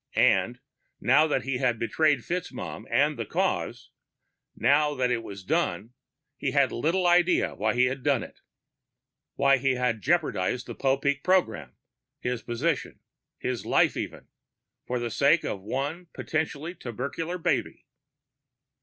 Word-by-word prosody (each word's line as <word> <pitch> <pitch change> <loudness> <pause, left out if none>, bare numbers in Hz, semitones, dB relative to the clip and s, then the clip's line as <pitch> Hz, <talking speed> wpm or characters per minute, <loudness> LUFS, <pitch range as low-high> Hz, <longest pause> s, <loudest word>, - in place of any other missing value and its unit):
And, - - +3 0.4
now 145 +5 +4
that 150 - 0
he 135 -2 -2
had 125 -3 +1
betrayed 140 +5 +2
FitzMaugham 180 0 -5
and - - +2
the - - -2
Cause, - - -2 0.6
now 150 +1 +3
that 125 -2 +1
it 120 -2 0
was 100 -3 -9
done, 95 +4 -1 0.4
he - - -1
had - - +3
little 170 +9 0
idea 175 0 +3
why 110 +2 0
he 125 +1 +4
had 130 +1 -2
done 135 -4 +1
it, - - -12 1.0
why 140 0 +4
he 135 0 +1
had 125 -3 0
jeopardized 130 - 0
the - - -7
Popeek 140 +1 0
program, 180 - +1 0.4
his 125 -1 -2
position 135 +6 -2 0.4
his - - -3
life, - - +3
even - - -5 0.6
for 125 - -1
the 120 -1 -3
sake 145 +8 +3
of 100 - -3
one 140 - -3
potentially 155 +1 -3
tubercular 160 +5 -4
baby. 170 - -1
135 Hz, 140 wpm, -27 LUFS, 120-155 Hz, 1.0 s, now